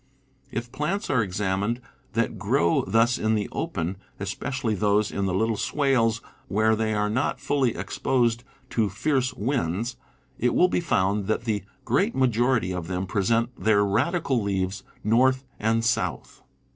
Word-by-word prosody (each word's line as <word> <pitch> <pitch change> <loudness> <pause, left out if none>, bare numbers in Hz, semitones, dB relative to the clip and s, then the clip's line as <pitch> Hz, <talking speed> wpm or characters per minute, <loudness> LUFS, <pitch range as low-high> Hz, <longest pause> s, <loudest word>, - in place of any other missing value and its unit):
If 120 +1 -4
plants 175 +7 -2
are 125 - +3
examined 100 +3 -1 0.3
that - - -1
grow 85 0 +2
thus 115 +2 +3
in 110 0 +2
the 105 -1 -1
open, 85 +4 -3 0.2
especially 130 -5 -2
those 105 +1 +2
in 100 -1 -1
the 95 - -1
little 110 +2 +1
swales 120 -6 +1 0.3
where 110 +2 +2
they 110 0 0
are 105 0 +1
not 120 +6 0
fully 135 -5 +1
exposed 120 -2 0 0.3
to 110 -3 +1
fierce 130 +5 0
winds, 115 - -1 0.4
it 125 - +1
will 180 - +5
be 180 - +1
found 100 - +1
that 110 +1 0
the 110 -4 -1 0.2
great 195 - +1
majority 120 -5 +2
of 90 -2 -4
them 90 +1 -2
present 115 +5 +1
their 105 -3 +3
radical 130 - +1
leaves 95 -1 -1 0.2
north 130 +4 +3 0.2
and 115 +1 +1
south. 115 - -1
115 Hz, 150 wpm, -25 LUFS, 100-125 Hz, 0.4 s, will